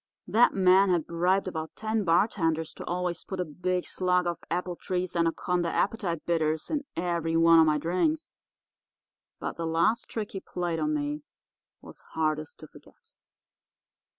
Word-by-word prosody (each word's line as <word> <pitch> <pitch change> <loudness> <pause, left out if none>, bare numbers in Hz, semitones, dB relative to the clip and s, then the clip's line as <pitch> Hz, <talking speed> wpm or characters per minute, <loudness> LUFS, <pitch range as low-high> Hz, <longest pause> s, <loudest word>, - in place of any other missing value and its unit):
That 235 +3 +4
man 190 +1 +5
had 175 -4 +1
bribed 180 +3 +1
about 160 -3 -5
ten 220 -1 -1
bartenders 165 -3 +1
to - - -9
always 180 -1 -2
put 190 - -6
a 180 - 0
big 180 +3 -2
slug 180 -1 +1
of 175 -1 -2
Appletree's 180 +1 -2
Anaconda 170 +1 0
Appetite 190 -6 -1
Bitters 160 -2 0
in 295 -2 -1
every 170 -1 0
one 165 0 +6
of 160 - +6
my 150 -1 +3
drinks. 185 - -1 1.1
But - - -5
the 165 -1 -2
last 170 +9 +1
trick 215 -2 -4
he 195 - -5
played 175 -3 -3
me 300 -1 -1 0.6
was - - -12
hardest 155 -1 -1
to - - -10
forget. - - -18
180 Hz, 150 wpm, -28 LUFS, 165-195 Hz, 1.1 s, one